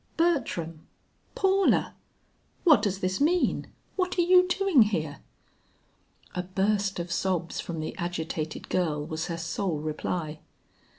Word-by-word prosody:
"Bertram! 230 - 0 0.5
Paula! 390 0 +3 0.7
What 315 -5 +6
does 195 -2 -1
this 185 +6 -1
mean? 345 +4 +2 0.3
What 365 -1 0
are 350 - +4
you 365 +1 +6
doing 375 -6 +4
here?" 160 -9 0 1.1
A 180 - -1
burst 195 +2 0
of 170 0 -4
sobs 175 -1 -1
from 165 -2 -4
the 155 - -5
agitated 160 -3 -3
girl 155 -5 0
was 160 +1 -3
her 170 - -3
sole 165 +1 -2
reply. 155 +1 -3
185 Hz, 125 wpm, -27 LUFS, -, 1.1 s, What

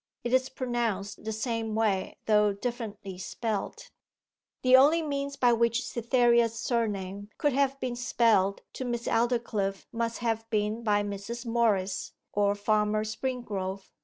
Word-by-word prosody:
It 240 - -2
is 260 0 +3
pronounced 230 -6 -2
the 220 - -2
same 225 0 -2
way, 210 -4 0
though 210 -1 +4
differently 205 -4 -5
spelt.' 215 +2 -4 0.7
The 255 0 +7
only 300 +5 +6
means 280 -1 -3
by 245 -3 +4
which 235 +2 +1
Cytherea's 235 -1 +2
surname 205 -4 -2
could 290 -3 +1
have 275 0 +1
been 250 -2 -2
spelt 225 -5 +2
to - - -5
Miss 240 -1 -3
Aldclyffe 225 -5 0
must 230 0 -2
have 225 -1 -2
been 215 +1 0
by 205 -2 +2
Mrs. 205 +4 -5
Morris 215 -5 0 0.2
or 205 0 +2
Farmer 210 +1 +1
Springrove. 215 -5 -4
225 Hz, 135 wpm, -28 LUFS, 205-240 Hz, 0.7 s, The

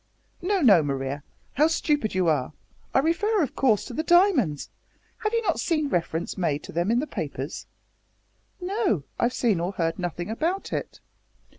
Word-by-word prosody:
"No, 385 +1 +1
no, 205 - +7
Maria, 140 0 -3 0.3
how 300 +3 +4
stupid 295 - 0
you 185 -2 +2
are! 150 -3 +1 0.4
I - - +1
refer, 360 +8 +2
of 285 +1 -4
course, 225 -7 +2
to - - -8
the 310 - -1
diamonds. 320 - +3 0.5
Have 425 - -1
you 460 0 0
not - - 0
seen 310 -4 0
reference 170 -3 -2
made 150 -5 0
to - - -9
them 170 +4 0
in 235 - +3
the 270 - +1
papers?" - - -5 0.9
"No. 375 - 0 0.2
I've 240 +1 +2
seen 220 -8 +2
or 175 +3 -2
heard 165 -2 -1
nothing 175 +2 -3
about 335 - -2
it." - - -4
240 Hz, 170 wpm, -25 LUFS, -, 0.9 s, no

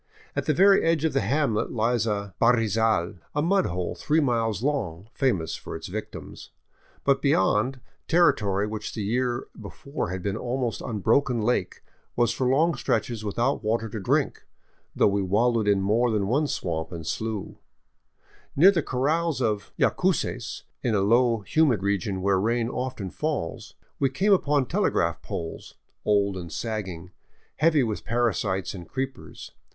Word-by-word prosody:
At - - -2
the 155 - +3
very 195 +4 +6
edge 165 -1 +2
of 160 - +1
the - - +2
hamlet 120 0 0
lies 115 0 +1
a 100 -2 -2
harrizal, 110 -5 +2 0.2
a 150 - +2
mud 195 +3 +2
hole 90 0 -3
three 155 +2 +1
miles 115 - 0
long, 105 - -2
famous 100 - 0
for - - -8
its - - -7
victims. - - -7 0.5
But 140 -1 +2
beyond, 125 0 +2 0.3
territory 105 - +3
which 105 0 -5
the 110 - -3
year 120 +3 -1 0.2
before 140 - -5
had 90 0 -4
been 100 -1 -1
an - - -7
almost 125 -1 -2
unbroken 115 +2 +1
lake 105 -6 -1 0.3
was 120 -1 +2
for 125 +2 -1
long 155 +7 +3
stretches 115 -3 -1
without 120 +6 -1
water 115 +1 0
to 110 - -5
drink, 95 - 0 0.5
though - - +4
we 100 0 +1
wal 105 +6 +2
lowed 110 -3 0
in 100 -1 +3
more 110 +5 +2
than 105 -3 0
one 140 +9 +1
swamp 80 - -3
and 85 -2 -7
slough. 110 +4 -4 1.0
Near 180 +8 +7
the 175 -4 +1
corrals 150 +5 0
of 110 -5 -1
Yacuces, - - 0 0.2
in 115 -3 0
a 100 - +2
low, 115 +2 +3
humid 120 - +2
region 100 -1 -1
where 100 -1 +3
rain 115 +3 0
often 125 -7 -4
falls, 150 - -4 0.2
we 135 - +2
came 195 +10 +2
upon 145 -7 +2
telegraph - - 0
poles, 80 -1 -6 0.3
old 100 -2 +2
and 85 -3 -7
sagging, 95 -5 -5 0.5
heavy 155 -2 +4
with 110 -3 -3
parasites 110 -5 0
and 90 -3 -9
creepers. 135 0 -6
115 Hz, 160 wpm, -26 LUFS, 100-135 Hz, 1.0 s, Near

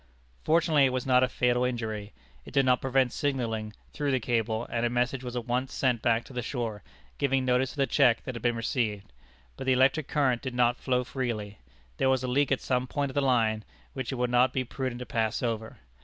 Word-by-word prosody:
Fortunately 160 -3 +4
it 130 - +2
was 130 -1 -2
not 125 -1 +4
a 130 - +4
fatal 125 0 +1
injury. 110 -4 -3 0.3
It - - -12
did 135 -1 +4
not 125 -1 +3
prevent 130 -1 +1
signalling 115 -6 -2 0.2
through 145 -1 -1
the 130 -1 +2
cable, 115 -1 -1
and 115 0 -1
a 120 - +2
message 125 +2 -1
was 125 -1 -6
at 120 -2 -3
once 125 +2 -2
sent 125 -4 +1
back 115 0 +1
to - - -13
the 125 - -2
shore, 115 -4 -4 0.4
giving 135 -2 +1
notice 130 +1 +1
of - - -16
the 135 - +3
check 120 -3 +3
that 130 - -5
had 115 - -7
been 120 -1 +1
received. 110 - -2 0.4
But 130 - -6
the 130 - +5
electric 135 +3 +3
current 130 -5 +1
did 130 -2 -5
not 120 0 +3
flow 125 -1 0
freely. 115 -6 -4 0.4
There 130 - +2
was 130 -1 +2
a - - -1
leak 140 +2 +1
at 135 - +1
some 125 -1 0
point 140 +1 -2
of - - -13
the 145 - +1
line 115 -5 +2 0.3
which 130 -1 -4
it - - -3
would 125 -1 -1
not 125 +1 +4
be 130 - 0
prudent 130 0 -4
to - - -5
pass 110 -1 -1
over. 115 -2 -3
125 Hz, 230 wpm, -28 LUFS, 115-130 Hz, 0.4 s, the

